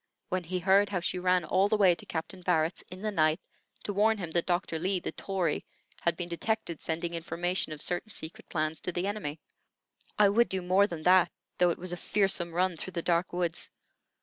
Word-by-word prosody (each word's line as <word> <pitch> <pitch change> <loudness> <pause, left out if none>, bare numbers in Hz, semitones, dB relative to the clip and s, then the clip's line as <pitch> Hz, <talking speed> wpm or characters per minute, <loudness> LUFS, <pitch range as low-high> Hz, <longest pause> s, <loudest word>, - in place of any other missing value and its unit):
when 185 -1 -1
he 185 +3 -2
heard 195 +3 +4
how 195 -3 0
she 180 +1 -2
ran 180 -1 +2
all 190 +5 +3
the 215 - +3
way 190 -4 +6
to - - -6
Captain 170 +3 -5
Barrett's, 170 -1 +1
in 185 +2 -9
the 215 - 0
night, 155 -2 +3 0.4
to 205 - -3
warn 215 +2 +3
him 175 -5 -5
that 170 0 0
Doctor 175 -2 0
Lee, 185 +2 0
the - - -4
Tory, 185 -6 -1 0.4
had 170 -1 +1
been 175 - -3
detected 170 -1 -2
sending 170 +1 -2
information 170 +1 -1
of 150 -1 -4
certain 180 +4 -2
secret 160 -5 -8
plans 155 0 -1
to - - -2
the 175 +1 -2
enemy. 200 -7 -3 0.8
"I 210 -1 +6
would 235 +4 +3
do 190 -1 -1
more 190 +3 +4
than 170 -5 -6
that, 180 -1 +5 0.3
though 180 0 +5
it 170 - -1
was 180 0 -4
a - - -3
fearsome 190 -2 +1
run 180 0 +1
through 185 - -7
the 170 - -2
dark 170 +1 +1
woods. 175 -2 -2
180 Hz, 215 wpm, -30 LUFS, 170-190 Hz, 0.8 s, way